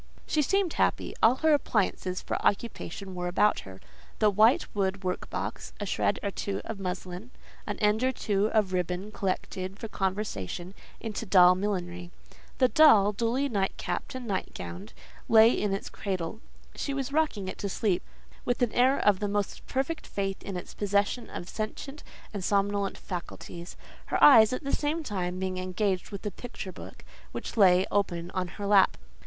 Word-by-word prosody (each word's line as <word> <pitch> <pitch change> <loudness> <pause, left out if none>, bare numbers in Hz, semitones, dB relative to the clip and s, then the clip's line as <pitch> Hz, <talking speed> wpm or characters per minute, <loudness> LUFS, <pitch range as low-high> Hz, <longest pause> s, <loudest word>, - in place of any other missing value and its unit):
She 305 - +1
seemed 390 +4 +1
happy; - - 0
all 230 +3 +6
her 315 - +6
appliances 195 -8 0
for - - -3
occupation 200 -3 -2
were 180 0 -3
about 200 +4 +3
her; 95 -1 -10 0.4
the 210 -1 +4
white 220 +5 +5
wood 195 -1 -1
workbox, 180 0 -4
a - - -3
shred - - 0
or 200 - -1
two 195 0 -3
of 220 -3 -5
muslin, 185 +3 -5 0.4
an - - -3
end 210 +2 +2
or 260 - +3
two 210 -4 0
of 210 -4 +1
ribbon 180 +3 -2
collected 185 -1 -3
for 225 - -6
conversion 190 - -3 0.3
into 225 0 -5
doll 180 -2 +7
millinery. 180 -2 -3 0.5
The 255 - +5
doll, 235 -9 +6
duly 235 +6 0
night 200 -6 0
capped - - -4
and 255 -1 -5
night 195 -4 -3
gowned, 90 +3 -7 0.4
lay 225 +1 +8
in 210 - 0
its 195 - -3
cradle; 190 +1 -4 0.3
she 280 - -3
was 275 0 -3
rocking 295 -11 0
it - - -6
to 200 - -2
sleep, 190 -2 0 0.4
with 245 0 0
an 235 - +1
air 260 +3 +4
of 205 -3 +3
the 205 - -1
most 205 0 -2
perfect 275 +5 -2
faith 195 -1 -3
in 195 -2 -5
its 180 - -8
possession 205 +4 0
of 175 - -7
sentient 250 +8 -5 0.3
and 200 -3 -4
somnolent 200 0 +1
faculties; 175 -1 -7 0.3
her - - 0
eyes, 225 -7 +9
at 255 - -3
the 275 - -3
same 310 +2 -1
time, 185 -7 -3
being 185 0 -2
engaged 185 +1 -1
with 200 -1 -8
a 210 - -1
picture 215 -2 -7
book, 185 - -11 0.3
which - - -6
lay 185 -3 +6
open 175 -4 -1
on 185 -1 -2
her 200 +3 -7
lap. 200 -2 +5
200 Hz, 175 wpm, -28 LUFS, 185-225 Hz, 0.5 s, eyes